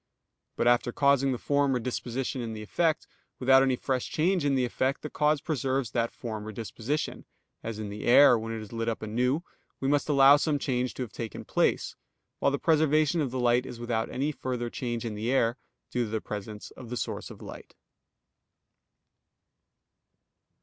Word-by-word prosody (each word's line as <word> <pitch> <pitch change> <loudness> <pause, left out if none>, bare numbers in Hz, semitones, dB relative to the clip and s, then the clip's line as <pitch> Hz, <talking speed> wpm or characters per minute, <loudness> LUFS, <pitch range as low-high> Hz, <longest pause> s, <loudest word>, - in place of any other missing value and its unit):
But - - +1
after 120 0 +3
causing 140 0 +3
the 125 - -1
form 140 +1 +1
or - - +1
disposition 125 +2 -3
in 115 -1 -4
the 110 -1 -6
effect, 160 +8 0 0.3
without 135 +1 +5
any 135 -1 +3
fresh 130 0 -2
change 175 +2 +1
in 140 -1 +2
the 130 -1 +2
effect, 130 +3 -1
the 150 - -5
cause 150 -1 +2
preserves 135 -5 -1
that 115 -1 0
form 110 -3 -6
or - - -5
disposition; 115 +7 -4 0.4
as 110 -1 -5
in 110 -1 -5
the 105 +1 -6
air, 125 +1 +7
when 115 0 -3
it 110 -1 -4
is 105 - -12
lit 115 0 -1
up 115 - -4
anew, 125 +8 0 0.4
we 135 - -1
must 145 +1 +1
allow 140 0 +7
some 150 0 +1
change 125 -3 -1
to 130 - -3
have 115 - -8
taken 115 -2 -6
place, - - 0 0.4
while - - +3
the 140 - -1
preservation 155 0 +3
of 140 - -1
the 130 +1 -3
light 120 +1 +2
is 120 - -8
without 115 -1 -1
any 140 +4 -1
further 125 -4 -4
change 120 -2 -3
in 115 - -3
the 110 +4 -2
air 120 -3 +2 0.4
due 125 -1 0
to - - -7
the 110 +1 -1
presence 105 0 -7
of 125 -3 -11
the 125 - -3
source - - -4
of - - -11
light. - - -11
125 Hz, 190 wpm, -28 LUFS, 115-140 Hz, 0.4 s, air